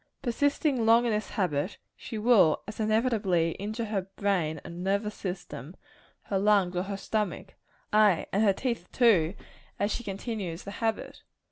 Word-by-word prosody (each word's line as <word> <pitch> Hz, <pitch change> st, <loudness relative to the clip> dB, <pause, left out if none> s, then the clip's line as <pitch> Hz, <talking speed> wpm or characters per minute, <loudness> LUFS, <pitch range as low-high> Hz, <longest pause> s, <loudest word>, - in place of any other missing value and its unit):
Persisting 280 Hz, 0 st, +1 dB
long 230 Hz, +2 st, +5 dB
in 235 Hz, -, +1 dB
this 210 Hz, 0 st, -1 dB
habit, 180 Hz, -1 st, -1 dB, 0.2 s
she 225 Hz, -, -7 dB
will 210 Hz, -8 st, +4 dB
as 215 Hz, -, -8 dB
inevitably 215 Hz, -6 st, +2 dB
injure 215 Hz, +3 st, -3 dB
her 200 Hz, -3 st, -2 dB
brain 175 Hz, -7 st, 0 dB
and 175 Hz, +1 st, -7 dB
nervous 200 Hz, +2 st, 0 dB
system, 180 Hz, -, -6 dB, 0.5 s
her 195 Hz, -, -1 dB
lungs 195 Hz, -3 st, +3 dB
or 180 Hz, -, +1 dB
her 195 Hz, +1 st, -4 dB
stomach 210 Hz, -2 st, -3 dB, 0.4 s
ay, 210 Hz, -5 st, +4 dB
and 200 Hz, -, +2 dB
her 210 Hz, -2 st, +5 dB
teeth 230 Hz, -3 st, -3 dB
too 200 Hz, -8 st, +4 dB, 0.4 s
as 205 Hz, +1 st, 0 dB
she 240 Hz, -, -4 dB
continues 195 Hz, -4 st, -4 dB
the 200 Hz, -, -7 dB
habit. 225 Hz, +1 st, -3 dB
205 Hz, 155 wpm, -28 LUFS, 180-225 Hz, 0.5 s, long